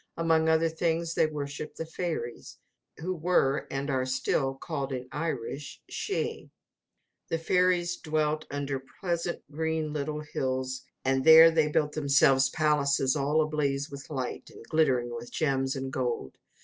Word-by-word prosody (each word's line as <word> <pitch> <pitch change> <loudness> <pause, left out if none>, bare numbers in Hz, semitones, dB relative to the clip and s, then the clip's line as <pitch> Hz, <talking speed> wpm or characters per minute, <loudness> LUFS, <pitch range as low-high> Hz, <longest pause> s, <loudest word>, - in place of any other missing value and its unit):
Among 160 -1 +3
other 160 +1 +4
things, 165 0 -1
they 160 - +3
worshipped 150 0 -6
the 165 - -4
Fairies, 160 -7 -5 0.4
who 180 +4 -3
were, 160 -5 +1
and 140 +1 -3
are 130 -1 0
still, 135 +1 0
called 140 -1 -4
in 130 -1 -4
Irish 145 -3 -4
Shee. - - -3 0.8
The 165 - 0
fairies 175 +1 +2
dwelt 155 -1 -1
under 140 -1 -3 0.2
pleasant 170 -2 -2
green 160 0 -2
little 150 +1 -3
hills; 130 -3 -3 0.2
and 135 0 +2
there 160 +1 +9
they 160 -2 +3
built 150 0 +1
themselves 140 -3 +4
palaces 140 -2 +2
all 150 +2 +2
ablaze 145 -1 -1
with 140 0 -9
light, 130 -5 -4
and - - -13
glittering 125 -7 +2
with 120 0 -7
gems 135 -3 0
and 135 0 -4
gold. 120 - -2
150 Hz, 145 wpm, -28 LUFS, 135-160 Hz, 0.8 s, there